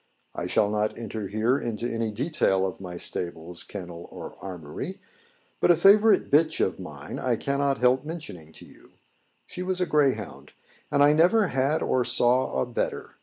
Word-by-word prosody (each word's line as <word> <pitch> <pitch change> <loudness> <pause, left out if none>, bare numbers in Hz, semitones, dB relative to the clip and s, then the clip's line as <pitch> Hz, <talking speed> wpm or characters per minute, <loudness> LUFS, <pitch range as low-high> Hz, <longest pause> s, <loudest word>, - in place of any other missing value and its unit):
I - - -4
shall 105 - +2
not 105 0 -1
enter 110 -3 -5
here 110 +7 +1
into 115 0 -3
any 115 -2 -2
detail 105 - 0
of 95 -1 -5
my 90 -2 -7
stables, 85 0 -1
kennel, 90 -4 -9
or - - -9
armoury; 90 - -7 0.6
but - - +2
a 175 - +7
favourite 205 +6 +5
bitch 155 +2 +3
of - - 0
mine - - -8
I 125 -2 0
cannot 140 +2 0
help 125 +1 +3
mentioning 150 - -8
to - - -13
you; - - -19 0.5
she 180 - -8
was 185 0 -2
a 180 - +1
greyhound, 145 -5 -1 0.4
and 145 -1 +4
I 145 +1 +6
never 180 +6 +4
had 135 +4 0
or 130 - +1
saw 120 - +2
a 65 - +1
better. - - -4
125 Hz, 170 wpm, -26 LUFS, 95-150 Hz, 0.6 s, a